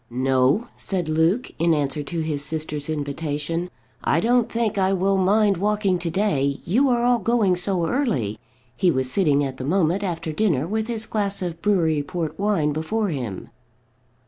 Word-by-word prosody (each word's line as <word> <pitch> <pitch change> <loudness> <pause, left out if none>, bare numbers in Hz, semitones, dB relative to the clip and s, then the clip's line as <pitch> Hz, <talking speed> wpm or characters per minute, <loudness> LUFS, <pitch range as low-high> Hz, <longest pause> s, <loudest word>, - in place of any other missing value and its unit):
"No," 130 - +1
said 180 -4 -3
Luke, 160 +10 +1
in 165 0 +3
answer 145 -1 -1
to 165 +3 -4
his 150 -3 -2
sister's 150 -1 -2
invitation; 150 +3 -3 0.3
"I 160 - +2
don't 240 +3 +2
think 225 -3 0
I 190 0 +2
will 195 +1 +1
mind 200 +1 +3
walking 200 -1 +1
to 170 -1 -2
day: 150 -7 0
you 245 +10 +3
are 240 -1 +2
all 245 0 +3
going 215 -3 +2
so 180 -1 +1
early." 165 - -1 0.4
He 180 - +2
was 130 -4 0
sitting 150 -7 +2
at 135 -2 -4
the - - -5
moment 175 +4 +1
after 165 -4 -3
dinner 155 -6 +1
with 220 +5 -2
his 225 -2 -2
glass 200 -3 -2
of 170 -2 -5
brewery 165 -7 +2
port 160 +2 -4
wine 195 -8 +1
before 205 +8 -1
him. 125 - -5
175 Hz, 170 wpm, -23 LUFS, 150-205 Hz, 0.4 s, in